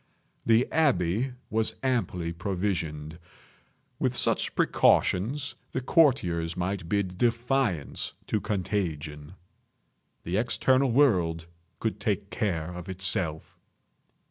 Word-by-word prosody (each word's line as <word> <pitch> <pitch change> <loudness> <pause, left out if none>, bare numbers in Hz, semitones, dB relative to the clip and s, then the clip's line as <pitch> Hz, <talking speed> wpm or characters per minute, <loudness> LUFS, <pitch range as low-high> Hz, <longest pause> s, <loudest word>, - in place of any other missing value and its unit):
The 115 +2 +4
abbey 125 - +2 0.2
was 110 0 +1
amply 105 -10 -1
provisioned. 85 -4 -3 0.8
With - - 0
such - - 0
precautions 130 +10 +2 0.2
the - - 0
courtiers 95 - +2
might 90 -1 -2
bid 95 -3 -1
defiance 120 - 0
to 105 - -1
contagion. 90 -6 -3 0.9
The 90 +3 -1
external 130 +3 +3
world 90 - +3 0.3
could 110 -2 -2
take 100 -1 -2
care 90 -7 -1
of 90 +2 -8
itself. 90 -4 -2
95 Hz, 95 wpm, -27 LUFS, 85-120 Hz, 0.9 s, The